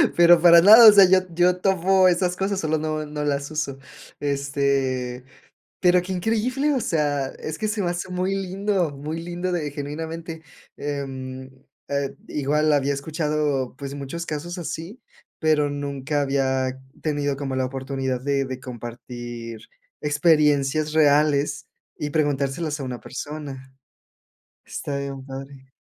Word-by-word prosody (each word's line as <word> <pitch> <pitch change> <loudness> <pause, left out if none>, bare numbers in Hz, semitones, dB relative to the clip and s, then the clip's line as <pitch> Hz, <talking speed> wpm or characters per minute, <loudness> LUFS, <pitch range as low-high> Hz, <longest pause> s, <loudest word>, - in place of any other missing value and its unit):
Pero 170 -1 +7
para 170 -1 +8
nada, 220 +5 +10
o - - +12
sea, 200 -1 +8
yo 185 0 +6 0.2
yo 180 +1 +3
tovo 190 0 +3
esas 180 0 +1
cosas, 195 0 -1
solo 160 0 0
no 155 0 -2
no 150 0 -4
las 140 +1 -1
uso. 140 -3 -3 0.4
Este, 140 -3 -1 0.5
pero 180 -1 +4
qué 185 - -7
increíble, 230 +10 0
o 255 - 0
sea, 145 -6 0
es 155 +3 -7
que 215 - -2
se 210 -1 -2
me 175 - 0
hace 175 +1 -4
muy 185 +2 -1
lindo, 195 -2 -1
muy 150 +4 -5
lindo 175 +1 -3
de 150 -4 -2
genuinamente, 160 +3 -6 0.3
em, 135 -2 -5 0.4
eh, 140 -1 -2
igual 150 +1 +1
había 140 0 +2
escuchado, 150 -3 -1
pues 140 0 -6
muchos 145 +5 -5
casos 165 +4 -5
así, 165 - -6 0.4
pero 155 -2 +2
nunca 145 0 -2
había 130 -1 0 0.3
tenido 145 -3 -1
como 135 -2 -3
la 130 - 0
oportunidad 130 -1 -3
de 140 0 0
de 130 -1 -6
compartir 120 -1 -8 0.4
experiencias 150 -1 +2
reales 150 -1 +3 0.3
y 150 - -3
preguntárselos 145 0 -1
a - - -4
una 125 -2 -5
persona. 135 -2 -8 0.9
Está 140 -1 -4
bien 135 -1 -6
padre. 135 0 -10
150 Hz, 140 wpm, -23 LUFS, 135-170 Hz, 0.9 s, o